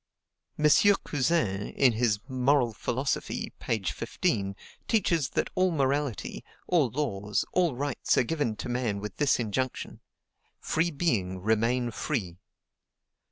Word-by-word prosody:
M. 150 - 0 0.4
Cousin, 130 - 0
in 130 -3 +3
his 110 -2 +2
"Moral 130 -2 +2
Philosophy," 130 +5 -2
page 105 -6 -1
15, 100 -1 -1 0.3
teaches 170 - +2
that - - -1
all 185 0 +3
morality, 140 - -1 0.2
all 160 -8 +3
laws, 105 -6 -1
all 175 -7 +2
rights 140 +1 0
are - - +5
given 145 -5 -1
to - - -6
man 120 -4 -1
with 105 0 -7
this 145 -4 +2
injunction: 120 +3 -3 0.6
"FREE 165 +2 0
BEING, 115 - 0
REMAIN 115 +4 +1
FREE." 95 - -3
125 Hz, 120 wpm, -28 LUFS, 110-145 Hz, 0.6 s, are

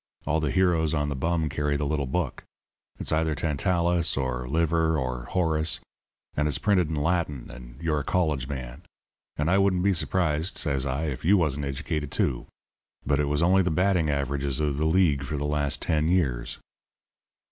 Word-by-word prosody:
All 80 +2 +1
the 75 -2 -1
heroes 80 -3 +2
on 75 -1 0
the 70 - -2
bum 80 +3 0
carry 75 -1 -1
the 75 - -2
little 70 -1 -1
book. 80 +1 -2 0.5
It's - - -2
either 80 0 +1
Tantalus 85 +2 0
or 65 -2 -2
Liver 80 +1 +2
or 65 -3 -3
Horace, 80 -2 0 0.5
and 75 +1 0
its 75 - +1
printed 95 -6 +2
in 80 - -2
Latin, 75 -3 -1
and 60 -1 -12
you're 80 -2 0
a - - -4
college 75 -8 0
man. 65 -3 -6 0.6
And 75 - 0
I 95 +3 +4
wouldn't 95 -2 +2
be 100 0 +3
surprised,' 85 0 0
says 70 -4 0
I, 65 +4 -2
'if 70 -6 -3
you 100 +6 +5
wasn't 75 -4 0
educated, 70 +1 -3
too.' 65 -3 -1 0.6
But 70 0 +1
it 75 - +2
was 75 +3 +1
only 95 +3 +5
the 90 - +1
batting 90 -1 +2
averages 70 -1 -1
of 75 -2 0
the 75 - 0
League 80 -4 +3
for 70 +2 -4
the 70 - -2
last 75 -1 -1
ten 80 -2 +1
years. 70 -10 0
75 Hz, 185 wpm, -26 LUFS, 70-85 Hz, 0.6 s, you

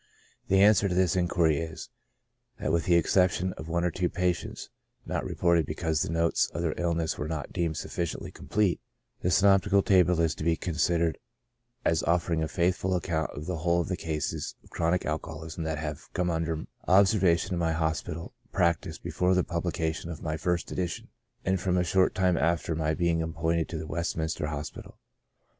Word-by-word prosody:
The 95 +1 +5
answer 105 -1 +5
to 90 - -1
this 90 -2 +3
inquiry 85 -4 +2
is, 80 -1 -6 0.7
that - - -1
with 85 0 +1
the 85 - +4
exception 90 +1 +2
of 80 - -9
one 85 +1 0
or 90 - +1
two 90 +2 0
pa 90 -1 +1
tients, 80 - -8 0.4
not - - -2
reported 85 -4 +2
because 80 -1 -1
the - - -1
notes 85 0 +2
of 85 - -2
their 80 -2 0
illness 85 -2 -1
were 75 - -2
not 80 -2 -4
deemed 85 -4 -1
sufficiently 85 -2 -4
complete, 105 -4 0 0.4
the 90 - +1
synoptical 100 +2 +4
table 90 -4 +4
is 80 -2 +2
to - - -7
be 85 0 +3
considered 85 0 0 0.7
as 80 - +3
offering 85 -1 +1
a 80 - 0
faithful 90 +2 0
account 80 -3 -1
of 75 - -6
the 90 0 -2
whole 85 +2 +1
of 85 - -5
the 90 - 0
cases 80 -4 -3
of - - -21
chronic 85 +2 0
alcoholism 80 +1 -4
that 80 -1 -2
have 75 +1 -6
come 90 -1 0
under 80 -1 -2 0.2
obser 100 +3 +5
vation 85 -2 +2
in 90 - -1
my 85 -1 +1
hospital 80 +5 -2 0.2
practice 85 -3 +1
before 90 +1 0
the 90 - +3
publication 85 -1 -2
of 85 - -7
my 80 -1 -1
first 85 +2 -1
edition, 90 -3 -3 0.4
and 95 0 +1
from 90 -1 +1
a 90 - +3
short 95 +1 +2
time 90 -2 +2
after 85 0 +1
my 80 0 0
being 85 -1 +1
appointed 80 0 -1
to 85 - -4
the 80 - -5
Westminster 80 -1 -2
Hospital. 75 0 -6
85 Hz, 190 wpm, -28 LUFS, 80-90 Hz, 0.7 s, The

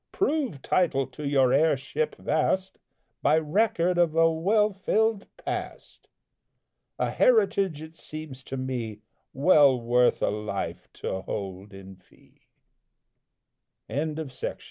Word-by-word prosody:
Prove 285 - -1
title 155 -7 +1
to 135 +3 -7
your 135 -3 +3
heirship 155 - +1
vast, 190 0 -1 0.4
By 150 +2 +4
record 175 +2 +1
of 165 -2 +2
a 165 0 +5
well 205 +6 +2
filled 215 +2 0
past! - - -6 0.9
A - - -1
heritage, 200 - +2
it 160 0 -11
seems 155 -5 -8
to 135 - -5
me, 120 -5 -4 0.3
Well 140 -3 +5
worth 120 +1 +2
a - - +2
life 105 -2 -5
to 95 - -4
hold 95 +1 -6
in 95 -1 -12
fee. 95 - -27 1.4
JAMES 150 +2 -2
RUSSELL 145 -5 -5
LOWELL. - - -10
150 Hz, 120 wpm, -26 LUFS, 125-185 Hz, 1.4 s, a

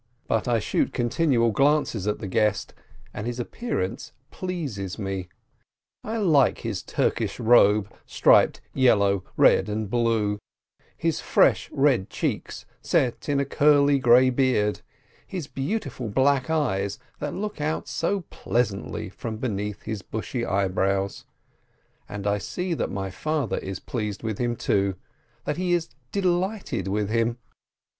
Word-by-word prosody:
But 115 0 0
I 120 -1 +3
shoot 110 - 0
continual 120 -1 +2
glances 135 -5 +2
at 105 - 0
the - - -7
guest, 105 +1 0 0.4
and 105 - -5
his 120 0 -3
appearance 120 - -3 0.2
pleases 140 - -4
me; 95 -3 -4 0.7
I 225 +2 -3
like 155 - +3
his 105 -6 -3
Turkish - - -1
robe, 110 -3 +5 0.2
striped - - +4
yellow, 100 -7 +3
red, - - +5
and 105 -1 -3
blue, 115 -4 +1 0.6
his - - -1
fresh, - - +3
red 135 -8 +2
cheeks - - -3 0.2
set 125 +2 0
in 140 -1 +2
a 140 - +1
curly 145 0 +4
grey 130 +1 +6
beard, 125 -5 +1 0.5
'his 180 -6 -4
beautiful 135 - -3
black 135 +5 +2
eyes 100 -12 0 0.2
that 145 -1 -3
look 210 -4 -4
out 155 +1 -2
so 195 +4 -1
pleasantly 110 -2 -2
from 110 +3 -6
beneath 105 -3 -3
his 110 -3 -4
bushy 110 +4 -4
eyebrows. 95 -1 0 0.8
And 100 0 -6
I 100 0 +1
see 180 - -3
that - - -2
my 95 -1 -4
father 150 +3 -1
is 95 -1 -5
pleased 105 -4 -4
with 110 -3 -3
him, 120 -1 0
too, 100 -3 +1 0.5
that 150 - -2
he 180 -1 0
is 170 -7 0 0.2
delighted 190 - -1
with 105 +1 -1
him. 115 +1 +1
120 Hz, 135 wpm, -25 LUFS, 105-145 Hz, 0.8 s, grey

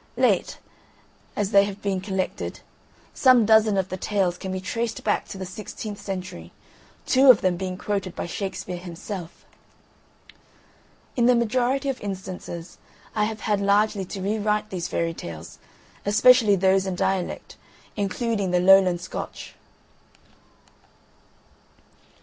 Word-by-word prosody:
Late - - +2 0.8
as 205 -1 -1
they 200 -1 +6
have 200 0 -6
been 195 -2 -1
collected, 190 -1 -3 0.5
some 255 -4 +5
dozen 220 -1 +4
of 190 0 0
the 185 - -4
tales 190 -2 0
can 190 +1 -6
be 185 - -3
traced 225 +4 -3
back 210 - 0
to - - -8
the 190 - -5
sixteenth 205 +2 -7
century, 185 - -6 0.5
two 265 +1 +5
of 245 - +8
them 185 -1 +1
being 185 0 -4
quoted 195 -3 -3
by - - -4
Shakespeare 180 0 -5
himself. 175 0 -8 1.7
In 240 -1 +3
the 250 - +5
majority 250 +4 +1
of 270 -2 -2
instances 185 -3 -7 0.3
I 210 -1 +1
have 215 0 -5
had 210 -2 0
largely 200 0 +2
to 190 +1 -6
rewrite 210 +1 -1
these 180 -2 -3
Fairy 165 0 -1
Tales, 85 - -9 0.4
especially 215 +1 +5
those 190 +1 +2
in 185 - -2
dialect, 185 0 -2 0.4
including 205 0 -1
the 180 0 +2
Lowland 185 -1 +5
Scotch. 180 - -7
195 Hz, 130 wpm, -24 LUFS, 185-215 Hz, 1.7 s, of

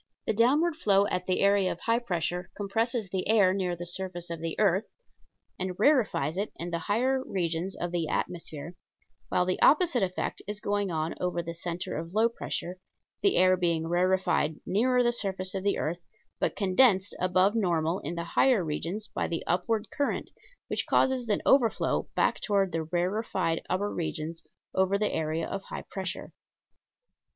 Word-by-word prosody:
The - - +1
downward 295 +9 +3
flow 200 -8 +3
at 180 0 -2
the 185 - +1
area 200 -1 +3
of - - -7
high 230 0 +2
pressure 180 -5 -2
compresses 220 +1 -1
the 185 0 -2
air 205 -4 +5
near 185 -2 -1
the 175 +1 -7
surface 175 -1 -5
of 165 - -4
the 165 -1 -4
earth 195 0 +2 0.7
and 185 -1 -3
rarefies 210 - +2
it 205 +2 -2
in 175 +1 -5
the 170 - -1
higher 260 +5 +2
regions 175 -3 -2
of 175 0 -4
the 170 -2 -1
atmosphere, 165 -1 -3 0.6
while 180 - +2
the 185 0 -1
opposite 310 -6 +5
effect 185 -1 -2
is 210 0 -4
going 205 -1 -1
on 160 -1 -2
over 180 -1 -1
the 170 0 -5
center 170 +1 -4
of 165 +2 -6
low 225 +2 +4
pressure, 185 -5 -4 0.4
the 400 - +3
air 185 0 +5
being 170 -3 0
rarefied 175 -2 +1
nearer 250 +5 +2
the 240 0 +2
surface 190 -4 -1
of 190 -1 -3
the 200 - +1
earth, 170 +3 -2 0.4
but - - 0
condensed 195 0 +3
above 185 +2 +3
normal 175 -5 +1
in 165 +4 -5
the 170 - -3
higher 205 +3 +3
regions 170 +8 -3
by - - -1
the 165 - -3
upward 210 +5 0
current, 285 - -2 0.4
which - - -2
causes 255 -3 +2
an 205 - +1
overflow 250 -5 +2
back - - +1
toward 200 -3 +1
the 165 -1 -2
rarefied 175 0 -1
upper 200 +3 -1
regions 165 0 -4 0.3
over 190 +1 +2
the 210 0 0
area 160 +1 -1
of 195 - -4
high - - -6
pressure. 190 -3 -5
185 Hz, 175 wpm, -28 LUFS, 170-210 Hz, 0.7 s, air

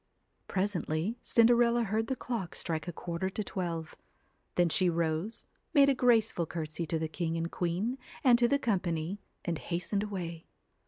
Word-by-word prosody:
Presently 185 +1 -1
Cinderella 235 0 +4
heard 220 +1 0
the 265 - -1
clock 230 -8 -4
strike 160 0 -2
a - - -2
quarter 170 +2 -3
to 210 +2 -3
twelve. 170 -5 -4 0.6
Then 175 -1 +4
she 180 +2 +3
rose, 165 +5 -1 0.3
made 280 -1 +7
a - - +5
grace 240 -4 +4
ful 170 -2 -2
courtesy 160 0 -4
to 165 - 0
the 160 0 -1
king 165 +1 -2
and 165 +1 -2
queen 190 +9 -1 0.2
and 245 -3 +6
to 240 - +5
the 280 - +3
com 225 -8 +1
pany, 170 +2 -3 0.3
and 170 -3 -1
hastened 180 +4 -2
away. 175 -5 -5
185 Hz, 170 wpm, -31 LUFS, 165-225 Hz, 0.6 s, made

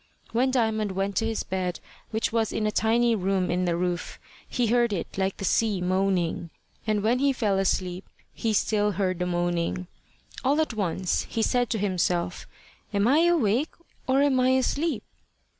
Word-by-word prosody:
When 250 +3 +2
Diamond 220 -5 0
went 195 +1 -2
to 225 - +1
his 225 -1 -2
bed, 185 -2 -3 0.3
which 220 0 -1
was 225 -2 +1
in 220 - -1
a 215 - +1
tiny 230 +2 +2
room 190 -3 0
in 180 +1 0
the 170 -1 0
roof, 175 0 -2 0.3
he 245 - 0
heard 235 0 +2
it 175 - -4
like 190 0 -1
the 195 - -4
sea 210 +1 +2
moaning; 180 -2 0 0.4
and 210 -2 +1
when 235 +3 +2
he 280 +1 +3
fell 210 -7 0
asleep 185 -1 0 0.3
he 225 - -1
still 210 0 +1
heard 185 -1 -1
the 180 - -1
moaning. 175 0 -1 0.6
All 280 +4 +2
at 315 -6 0
once 185 -3 -1
he 225 - -1
said 245 0 +1
to 225 - 0
himself, 180 -3 -1 0.4
"Am 205 0 +2
I 305 +6 +5
awake, 290 -5 +2 0.3
or 270 +2 +3
am 275 -3 +3
I 255 0 +4
asleep?" 290 +5 0
210 Hz, 175 wpm, -26 LUFS, 185-235 Hz, 0.6 s, I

